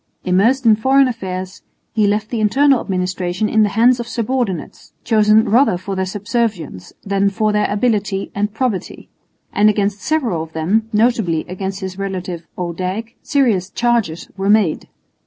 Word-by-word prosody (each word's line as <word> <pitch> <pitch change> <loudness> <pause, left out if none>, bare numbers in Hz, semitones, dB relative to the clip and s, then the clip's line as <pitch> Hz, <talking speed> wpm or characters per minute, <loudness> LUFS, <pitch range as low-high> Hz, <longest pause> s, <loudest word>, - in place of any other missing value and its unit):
Immersed 225 +9 +2
in 220 -2 +6
foreign 265 +4 +4
affairs, 190 -6 -5 0.3
he 215 -2 +2
left 210 +1 -1
the 235 - -1
internal 265 +5 +3
administration 185 +1 -2
in 220 +1 +2
the 210 - +3
hands 240 +2 +5
of 235 - -4
subordinates 235 -6 -3
chosen 215 -1 +4
rather 235 -4 +3
for 190 +2 -5
their 190 0 -1
subservience 200 - -3
than 200 0 +1
for 215 +1 0
their 210 0 +1
ability 205 -3 -1
and 205 +1 -1
probity; 220 -4 -3 0.4
and 210 +1 +4
against 205 -1 -1
several 250 - 0
of 160 0 -8
them, 205 +8 0
notably 215 -7 +1
against 190 +2 -5
his 190 0 -6
relative 185 -3 -5
Odijk, 185 +6 -4
serious 230 - +1
charges 230 -8 -1
were 195 0 -2
made. 205 -7 +2
205 Hz, 155 wpm, -18 LUFS, 185-230 Hz, 0.4 s, in